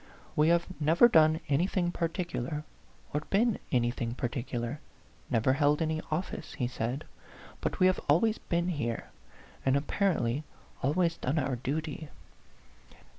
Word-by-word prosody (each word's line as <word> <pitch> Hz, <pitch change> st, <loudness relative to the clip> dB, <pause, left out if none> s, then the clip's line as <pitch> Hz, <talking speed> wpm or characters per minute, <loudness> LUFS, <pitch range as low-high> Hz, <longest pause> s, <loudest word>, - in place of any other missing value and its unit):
" -, -, -25 dB
We 150 Hz, +1 st, +4 dB
have 170 Hz, 0 st, +4 dB
never 160 Hz, +9 st, +6 dB
done 160 Hz, -5 st, +5 dB
anything 175 Hz, +4 st, +1 dB
particular, 165 Hz, -5 st, -2 dB, 0.5 s
or 150 Hz, -, 0 dB
been 225 Hz, +2 st, +2 dB
anything 120 Hz, -1 st, 0 dB
particular 120 Hz, +1 st, -3 dB, 0.5 s
never 120 Hz, +2 st, +3 dB
held 145 Hz, +1 st, +3 dB
any 160 Hz, -1 st, 0 dB
office," 160 Hz, 0 st, -3 dB
he 125 Hz, -, -1 dB
said; 125 Hz, +4 st, -3 dB, 0.6 s
"but -, -, -2 dB
we 185 Hz, -, +5 dB
have 185 Hz, 0 st, +4 dB
always 215 Hz, +9 st, +4 dB
been 170 Hz, +1 st, -1 dB
here, 125 Hz, -9 st, -3 dB, 0.5 s
and 135 Hz, 0 st, +3 dB
apparently 145 Hz, -, 0 dB, 0.4 s
always 165 Hz, +5 st, +1 dB
done 135 Hz, +5 st, -1 dB
our 135 Hz, -3 st, 0 dB
duty. 150 Hz, +4 st, -3 dB
150 Hz, 130 wpm, -30 LUFS, 130-170 Hz, 0.6 s, never